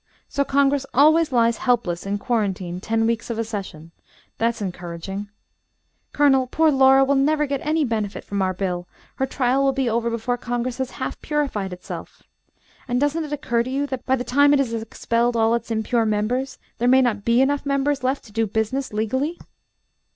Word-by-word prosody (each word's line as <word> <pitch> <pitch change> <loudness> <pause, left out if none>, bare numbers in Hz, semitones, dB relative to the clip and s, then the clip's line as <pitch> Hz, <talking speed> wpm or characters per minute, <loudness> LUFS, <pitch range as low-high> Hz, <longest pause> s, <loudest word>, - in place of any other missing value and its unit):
"So 280 - 0
Congress 280 0 +2
always 310 +3 +5
lies 235 -2 +3
helpless 195 -8 0
in 200 +1 -1
quarantine 195 -7 -2
ten 225 +1 0
weeks 230 +1 -1
of 230 - -3
a 230 - 0
session. 190 -7 -7 0.5
That's 230 0 0
encouraging. 185 +1 -5 0.8
Colonel, 270 -3 +3
poor 315 +4 +3
Laura 270 0 +6
will 275 +1 +2
never 300 +2 +2
get 275 -1 -3
any 305 0 +1
benefit 215 -4 -3
from 200 -1 -3
our 190 -1 +1
bill. 180 -2 -3 0.3
Her 265 - 0
trial 265 0 +1
will 270 0 +3
be 265 -1 0
over 235 +1 0
before 235 +2 -2
Congress 245 +1 -3
has 260 -1 -1
half 260 - -4
purified 275 -11 -2
itself. 180 0 -9 0.6
And 245 -1 0
doesn't 290 +3 0
it 295 - -9
occur 240 -5 0
to 245 - -4
you 275 +2 -1
that 260 -3 -5
by 265 - +3
the 250 - -3
time 285 +3 +4
it 285 - +4
has 250 -4 0
expelled 230 +1 -1
all 225 0 +3
its 235 - -2
impure 225 +1 0
members 240 +5 -1 0.2
there 245 - +1
may 260 +1 +6
not 215 -5 0
be 235 +2 +3
enough 280 +2 +2
members 275 0 0
left 265 +2 0
to 215 - -15
do 225 +1 0
business 220 +6 -2
legally?" 260 +10 -1
245 Hz, 190 wpm, -22 LUFS, 220-275 Hz, 0.8 s, Laura